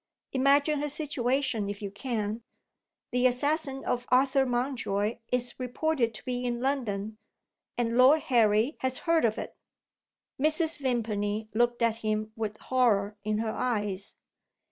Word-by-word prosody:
Imagine 280 +2 +3
her 295 - -1
situation 265 -6 -1
if 205 0 -5
you 200 -2 -5
can! 215 0 -3 0.7
The 250 +1 +4
assassin 275 +2 -1
of 245 0 -1
Arthur 265 +1 +3
Mountjoy 240 -4 -1
is 245 0 -2
reported 250 -2 0
to - - -10
be 250 -1 -2
in 240 -1 -1
London; 220 -6 -2 0.6
and 235 -1 0
Lord 280 +5 +7
Harry 225 +2 +3
has 260 0 -1
heard 330 -5 +3
of 220 -1 +1
it." - - -6 0.9
Mrs. 315 +1 +1
Vimpany 215 -5 -1
looked 240 +1 +1
at 230 -1 +2
him 215 -1 -2
with 215 -2 -3
horror 215 -6 +1
in 215 0 0
her 220 0 -1
eyes. 205 -6 -2
245 Hz, 140 wpm, -28 LUFS, 215-265 Hz, 0.9 s, Lord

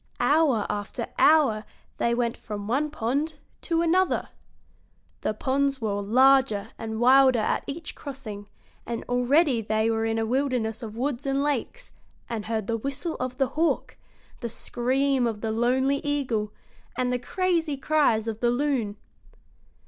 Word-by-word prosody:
Hour 285 -8 +3
after 205 -1 -4
hour 275 -9 +5 0.3
they 235 0 +1
went 235 -1 0
from 205 -2 -7
one 280 +7 +1
pond 290 +4 -2 0.3
to 335 -1 0
another. 365 +3 +2 0.9
The 215 - -1
ponds 275 +3 0
were 205 -3 -1
larger 255 0 +4
and 220 -1 -5
wilder 260 +1 +6
at 215 - 0
each 315 +4 -6
crossing, 225 -8 -8 0.4
and 235 -1 -4
already 250 +1 +2
they 220 +1 +1
were 225 0 0
in 225 0 0
a 225 - 0
wilderness 245 -3 -1
of 220 -2 -7
woods 270 +1 -2
and 275 +1 +1
lakes, 295 - -3 0.4
and 225 -3 -4
heard 220 -2 -1
the 230 +2 -1
whistle 280 +7 -4
of 255 0 -3
the 270 -2 +1
hawk, 320 +4 0 0.4
the 235 - -4
scream 255 +3 0
of 215 -2 -4
the 225 - -1
lonely 255 +5 +2
eagle, 250 -8 -1 0.5
and 250 0 0
the 250 - 0
crazy 335 +1 0
cries 270 -7 +2
of 220 -1 -3
the 240 - +2
loon. 245 -5 0
250 Hz, 150 wpm, -26 LUFS, 225-280 Hz, 0.9 s, wilder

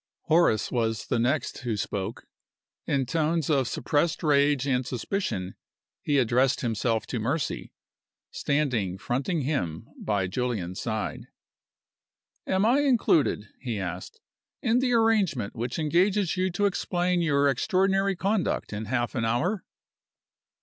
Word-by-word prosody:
Horace 160 - +2
was 115 -3 -1
the 120 - 0
next 130 +4 0
who 120 -4 -2
spoke. 100 +1 -4 0.6
In 135 -2 +1
tones 160 +2 0
of 135 -4 +2
suppressed 150 +8 0
rage 145 -2 +3
and 130 -2 +1
suspicion 120 - -3 0.5
he 145 - +1
addressed 130 +1 +2
himself 115 -1 0
to 120 - -3
Mercy, 135 +7 -2 0.6
standing 125 -11 0
fronting 135 - -1
him 115 - -2
by 100 -3 -1
Julian's 95 -4 -3
side. 110 -2 -3 1.2
"Am 190 +2 +2
I 245 +5 +4
included," 210 - +2
he 120 -4 -3
asked, 90 -1 -6 0.4
"in 230 +2 +3
the 255 -1 +1
arrangement 210 - +2
which 120 +2 -3
engages 180 +4 +2
you 185 0 +1
to 185 +3 0
explain 180 -2 0
your 145 -3 +3
extraordinary 195 - +2
conduct 195 - -1
in 105 +1 -4
half 120 +2 -1
an 115 - -1
hour?" 165 - 0
140 Hz, 130 wpm, -27 LUFS, 115-175 Hz, 1.2 s, I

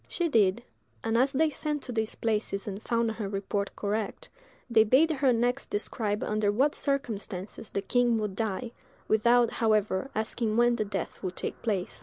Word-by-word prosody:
She 345 -2 -1
did; 220 -3 +3 0.4
and 225 0 0
as 260 +4 +3
they 305 +3 +2
sent 300 0 -2
to 250 - -5
these 220 -2 -1
places 210 -3 -1
and 200 0 -5
found 230 -1 0
her 215 -3 -4
report 200 0 -2
correct, 210 0 -3 0.4
they 225 -3 +5
bade 265 +9 +4
her 275 -3 +2
next 245 +3 0
describe 210 0 -1
under 210 -1 +1
what 270 +8 +2
circumstances 220 -8 -3
the 200 - -3
king 240 +2 +2
would 210 -3 -2
die, 225 +2 -2 0.4
without, 235 +2 +4
however, 215 0 +1
asking 220 0 -1
when 240 0 +4
the 215 - 0
death 200 - -4
would 185 -2 -4
take - - -5
place. 200 -6 -2
225 Hz, 175 wpm, -28 LUFS, 205-245 Hz, 0.4 s, they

